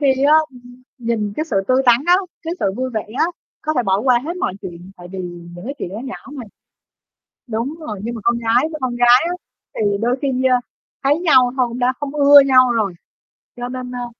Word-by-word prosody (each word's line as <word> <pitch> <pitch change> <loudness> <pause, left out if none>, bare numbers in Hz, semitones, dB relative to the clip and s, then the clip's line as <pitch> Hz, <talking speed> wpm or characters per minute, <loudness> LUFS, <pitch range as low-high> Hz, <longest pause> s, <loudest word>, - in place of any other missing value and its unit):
khi 270 -1 +2
á, 300 +2 +6 0.2
ưm, 245 0 -16 0.2
nhìn 225 -3 -2
cái 310 - -1
sự 230 -11 -3
tươi 260 +1 +3
tắn 240 0 +6
á, 355 +1 +6 0.3
cái 335 +1 -3
sự - - +1
vui 255 0 -2
vẻ 220 -2 -2 0.2
á, - - +4 0.4
có 310 - -1
thể 250 - +2
bỏ 195 -2 +1
qua 250 0 +3
hết 340 +3 -4
mọi 275 - -2
chuyện, 180 0 -9
tại 175 0 -11
vì 190 - -6 0.4
những 175 +3 -10
cái 275 +3 -5
chuyện - - -4
đó 205 +4 -7
nhỏ 260 - -6 0.2
mà. 275 -4 -7 1.0
Đúng 235 +6 -3
rồi, 215 -10 -6
nhưng 235 +2 -4
mà 230 - -6
con 235 0 +2
gái 235 +6 +2
với 310 - -5
con 250 -2 -2
gái 245 +4 +5
á - - -2 0.4
thì - - -2 0.2
đôi 245 +3 +1
khi, 280 - +1 0.2
a, 250 -1 +3 0.4
thấy 290 +3 +3
nhau 260 -8 +4
thôi 250 -2 +2
cũng 235 +1 -7
đã 250 +1 +2
không 290 0 -4
ưa 285 -1 +8
nhau 255 -2 +5
rồi. 210 -6 -1 0.6
Cho 245 0 -5
nên, 250 0 -6
a, 245 0 -4
245 Hz, 235 wpm, -19 LUFS, 230-275 Hz, 1.0 s, ưa